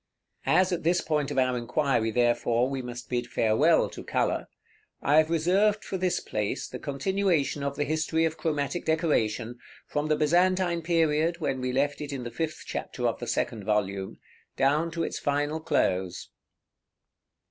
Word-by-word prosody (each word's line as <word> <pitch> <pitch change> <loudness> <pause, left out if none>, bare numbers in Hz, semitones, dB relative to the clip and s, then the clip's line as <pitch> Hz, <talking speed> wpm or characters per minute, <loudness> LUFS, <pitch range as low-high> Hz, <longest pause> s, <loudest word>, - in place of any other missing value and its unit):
As 185 +1 +4
at 175 - -1
this 175 +2 +2
point 150 -4 -1
of - - -4
our 130 -1 +2
inquiry, 120 -1 0
therefore, 120 +1 +2
we 135 -1 -3
must 120 -1 -7
bid 120 -1 -2
farewell 110 -1 +3
to - - -8
color, - - -1 0.5
I 145 +3 +3
have 155 0 +5
reserved 190 +6 +2
for - - -4
this 185 -1 0
place 105 -1 -3
the - - -7
continuation 155 0 0
of 140 0 -2
the 145 - 0
history 160 +2 0
of 160 -1 -1
chromatic 155 +1 -2
decoration, 125 -8 0 0.3
from 150 +1 -2
the 155 - +3
Byzantine 175 +3 +2
period, 165 0 +1
when 135 -5 -2
we 125 0 -1
left 140 +3 0
it 145 -1 -5
in 135 -3 -4
the 120 - -6
fifth 160 +2 -3
chapter - - -3
of - - -2
the - - -5
second 110 -3 -1
volume, 100 -2 -1 0.4
down 150 +5 +2
to 165 0 -3
its - - -3
final 145 +2 0
close. 95 - -1
145 Hz, 170 wpm, -27 LUFS, 125-165 Hz, 0.5 s, have